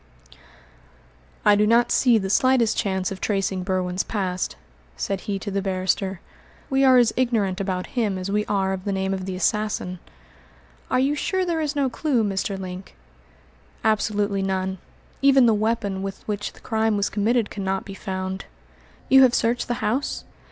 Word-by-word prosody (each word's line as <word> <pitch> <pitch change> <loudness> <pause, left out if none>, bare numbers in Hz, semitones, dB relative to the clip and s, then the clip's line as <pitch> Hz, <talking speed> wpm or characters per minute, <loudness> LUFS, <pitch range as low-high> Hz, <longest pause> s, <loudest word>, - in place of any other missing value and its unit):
"I 210 -1 +7
do 210 +1 +3
not 235 +2 +4
see 245 -3 +4
the 190 -2 -2
slightest 255 -2 +3
chance 190 -2 -1
of 190 - -7
tracing 195 -2 0
Berwin's 185 0 -1
past," 185 -4 -2 0.4
said 195 -1 -2
he 200 - 0
to 200 +1 -5
the 195 0 -1
barrister. 190 -1 -1 0.5
"We 270 0 +3
are 260 -1 +7
as 240 -2 +4
ignorant 215 -7 0
about 185 -2 -2
him 215 -6 0
as 185 +1 -4
we 210 +1 +1
are 195 -2 0
of 185 -1 -5
the 200 - -2
name 190 0 -1
of 190 -1 -4
the 185 - -3
assassin." 190 -2 -1 0.9
"Are 255 - +2
you 275 +3 +2
sure 375 +5 -1
there 335 -2 -1
is 300 -1 -2
no 280 -2 +2
clue, 255 -2 0
Mr. 195 -1 -1
Link?" 185 0 -8 0.9
"Absolutely 205 -2 +1
none; 190 -1 -2 0.4
even 270 -2 +6
the 230 - +5
weapon 215 -2 -1
with 195 0 -6
which 205 -1 -3
the - - -18
crime 220 -2 0
was 200 - +1
committed 220 +2 0
cannot 195 -1 -2
be 195 - -8
found." 190 0 -4 0.6
"You 265 0 +7
have 255 -2 +5
searched 235 +1 +1
the 240 - -1
house?" 255 +7 -1
205 Hz, 175 wpm, -23 LUFS, 190-235 Hz, 0.9 s, I